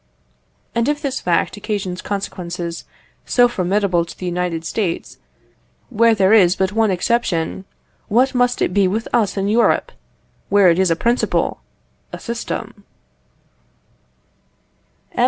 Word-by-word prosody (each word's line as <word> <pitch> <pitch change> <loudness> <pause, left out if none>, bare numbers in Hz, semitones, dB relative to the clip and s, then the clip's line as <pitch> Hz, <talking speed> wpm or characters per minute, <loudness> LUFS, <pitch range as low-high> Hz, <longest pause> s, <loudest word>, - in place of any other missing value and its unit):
And 235 +3 +1
if 295 0 0
this 275 -2 -3
fact 175 +3 0
occasions 195 -3 -4
consequences 175 -4 -5 0.4
so 245 -1 +4
formidable 190 -4 0
to 170 - -11
the 185 - -6
United 175 -2 -2
States, 175 0 -3 0.7
where 230 0 +4
there 195 0 +3
is 185 -4 +5
but 190 0 0
one 220 0 +2
exception, 185 -2 -1 0.4
what 250 +5 +2
must 245 -1 +1
it - - -1
be 200 -1 +3
with 220 +5 -2
us 210 -4 +1
in 195 0 0
Europe, 225 +3 +2 0.6
where 200 -2 +5
it 170 - 0
is 190 -1 +3
a 165 - +2
principle 235 +8 0 0.5
a - - -6
system? 230 -2 -6 2.3
M. - - -7
200 Hz, 135 wpm, -19 LUFS, 180-230 Hz, 2.3 s, is